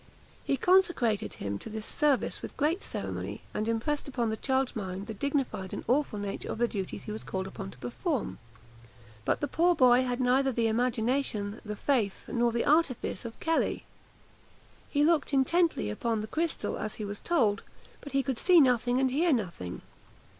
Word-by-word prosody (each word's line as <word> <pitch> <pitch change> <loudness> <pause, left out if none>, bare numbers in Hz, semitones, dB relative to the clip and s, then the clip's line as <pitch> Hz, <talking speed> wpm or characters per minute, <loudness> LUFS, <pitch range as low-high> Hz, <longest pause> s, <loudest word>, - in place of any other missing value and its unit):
He 275 - 0
consecrated 265 - +3
him 100 0 -4
to - - -8
this 220 0 -5
service 295 -4 +1
with - - -8
great 315 +6 +1
ceremony, - - -5
and 215 - -2
impressed 235 +7 -1
upon 240 -5 -1
the - - -1
child's 265 +2 0
mind 190 -2 -4
the 220 - -5
dignified 260 -6 -2
and - - -5
awful 265 -3 +1
nature 200 -1 -4
of - - -4
the 240 +1 +2
duties 195 -5 -5
he 210 - -6
was 215 - -5
called 190 0 -3
upon 195 0 -7
to - - -13
perform; 280 - -3 0.9
but - - +1
the 290 - 0
poor 345 +5 +3
boy 255 -3 +6
had 250 -1 -1
neither 260 +2 +3
the 235 -2 0
imagination, 225 -2 0
the 210 -1 -5
faith, 220 -5 0
nor 240 -1 +1
the 235 0 0
artifice 290 -6 +1
of 230 - -7
Kelly. 325 0 0 1.1
He 290 0 +2
looked 315 -3 +2
intently 300 - +2
upon 225 - -1
the - - -3
crystal 325 +6 -2
as 215 - -4
he 215 - -5
was 205 0 -5
told; 225 -13 +2 0.4
but 285 - -9
could 260 -3 -1
see 360 -2 +6
nothing 250 -2 +3
and 265 -1 +2
hear 325 +6 +2
nothing. 175 - -2
245 Hz, 180 wpm, -29 LUFS, 215-285 Hz, 1.1 s, boy